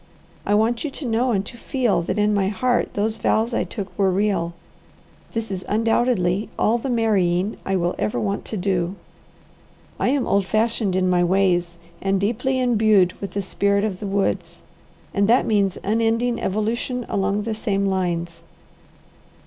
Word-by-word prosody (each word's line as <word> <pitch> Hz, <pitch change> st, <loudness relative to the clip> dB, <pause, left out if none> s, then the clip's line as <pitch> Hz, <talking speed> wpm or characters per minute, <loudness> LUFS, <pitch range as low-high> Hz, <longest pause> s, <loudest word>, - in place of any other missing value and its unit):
I 205 Hz, -, +3 dB
want 230 Hz, +2 st, +1 dB
you 305 Hz, -, -2 dB
to 275 Hz, +1 st, -8 dB
know 240 Hz, +2 st, +1 dB
and 200 Hz, -3 st, 0 dB
to -, -, -9 dB
feel 235 Hz, -5 st, 0 dB
that 170 Hz, -, -3 dB
in 210 Hz, 0 st, +2 dB
my 200 Hz, -2 st, +2 dB
heart 245 Hz, +5 st, 0 dB
those 215 Hz, +2 st, -1 dB
vows 225 Hz, +3 st, +1 dB
I -, -, +1 dB
took 185 Hz, +1 st, -7 dB
were 195 Hz, -1 st, +4 dB
real. 185 Hz, -3 st, 0 dB, 0.8 s
This 225 Hz, -2 st, -3 dB
is 185 Hz, -1 st, -4 dB
undoubtedly 220 Hz, -3 st, +1 dB
all 235 Hz, +2 st, +2 dB
the 265 Hz, -, -4 dB
marrying 205 Hz, -5 st, +1 dB
I 195 Hz, -, +1 dB
will 175 Hz, -1 st, 0 dB
ever 110 Hz, +3 st, -1 dB
want 100 Hz, -3 st, -2 dB
to 215 Hz, -, -4 dB
do. 180 Hz, -1 st, -1 dB, 1.0 s
I -, -, +2 dB
am 270 Hz, -1 st, +1 dB
old 200 Hz, -1 st, +1 dB
fashioned 220 Hz, -3 st, 0 dB
in 185 Hz, 0 st, +2 dB
my 180 Hz, -1 st, +3 dB
ways, 175 Hz, -2 st, +1 dB, 0.2 s
and 195 Hz, 0 st, +1 dB
deeply 250 Hz, +6 st, 0 dB
imbued 215 Hz, -7 st, +3 dB
with 200 Hz, -, -5 dB
the 200 Hz, -, -2 dB
spirit 200 Hz, +1 st, +1 dB
of 200 Hz, -4 st, -2 dB
the 205 Hz, -, -4 dB
woods, 195 Hz, 0 st, -2 dB, 0.5 s
and 200 Hz, 0 st, +2 dB
that 245 Hz, +3 st, +4 dB
means 200 Hz, -4 st, +1 dB
unending 230 Hz, +3 st, +1 dB
evolution 230 Hz, +5 st, -2 dB
along 200 Hz, +1 st, 0 dB
the 225 Hz, +1 st, -2 dB
same 200 Hz, -2 st, -1 dB
lines. 175 Hz, -3 st, -2 dB
200 Hz, 170 wpm, -22 LUFS, 185-225 Hz, 1.0 s, were